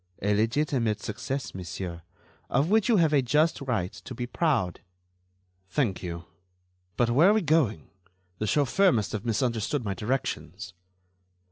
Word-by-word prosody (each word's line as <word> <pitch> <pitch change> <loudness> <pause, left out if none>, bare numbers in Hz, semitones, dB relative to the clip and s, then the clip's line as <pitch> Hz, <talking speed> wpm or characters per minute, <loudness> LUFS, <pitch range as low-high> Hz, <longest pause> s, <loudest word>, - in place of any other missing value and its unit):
"A 105 +1 +2
legitimate 115 0 +1
success, 130 +6 -4
monsieur, 90 -1 -6 0.5
of 140 +8 +1
which 220 +1 +3
you 225 - +5
have 160 -4 +3
a 140 - +5
just 150 +6 +2
right 95 -9 -2
to 130 - -9
be 120 - -3
proud." 125 - 0 0.9
"Thank 100 -5 0
you. 85 -1 -6 0.7
But 120 -1 +2
where 155 +10 +6
are - - +5
we 215 -2 +1
going? 145 - +1 0.5
The 110 - -1
chauffeur 150 - +3
must 105 -8 0
have 110 +1 -4
misunderstood 115 +2 -1
my 100 - -1
directions." 105 - -3
120 Hz, 145 wpm, -27 LUFS, 100-150 Hz, 0.9 s, where